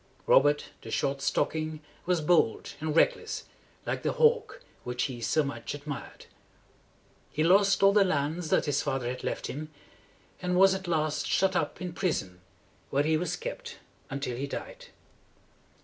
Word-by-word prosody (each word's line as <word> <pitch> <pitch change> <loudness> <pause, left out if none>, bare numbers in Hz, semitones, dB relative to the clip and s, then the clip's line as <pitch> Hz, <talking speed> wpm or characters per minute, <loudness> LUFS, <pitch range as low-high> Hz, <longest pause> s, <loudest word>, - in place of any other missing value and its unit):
Robert, 145 +2 +4
the 115 - -9
Short 135 +4 -1
Stocking, 155 +2 -1 0.3
was 180 -3 +2
bold 155 -7 +2
and 155 0 -2
reckless, - - +2 0.4
like - - -2
the - - 0
hawk 475 +1 +2 0.2
which 125 0 -2
he 125 -3 -4
so 155 +7 +2
much 140 +1 -5
admired. 145 0 -7 1.0
He 155 - -1
lost 195 +4 +4
all 195 0 +7
the 205 -1 +6
lands 160 -1 -1
that - - +3
his 145 -2 +1
father 135 -2 -2
had 125 +1 -4
left - - -3
him, 155 +3 -5 0.7
and 180 0 0
was 195 +1 +7
at 190 -1 -4
last 155 -3 0
shut 190 0 +2
up - - -1
in 180 -2 -5
prison, 95 - -2 0.5
where 140 +1 +2
he 155 +1 +2
was 175 +3 -1
kept - - -6 0.3
until 135 -2 -3
he 135 +3 -3
died. - - -7
155 Hz, 160 wpm, -29 LUFS, 140-185 Hz, 1.0 s, all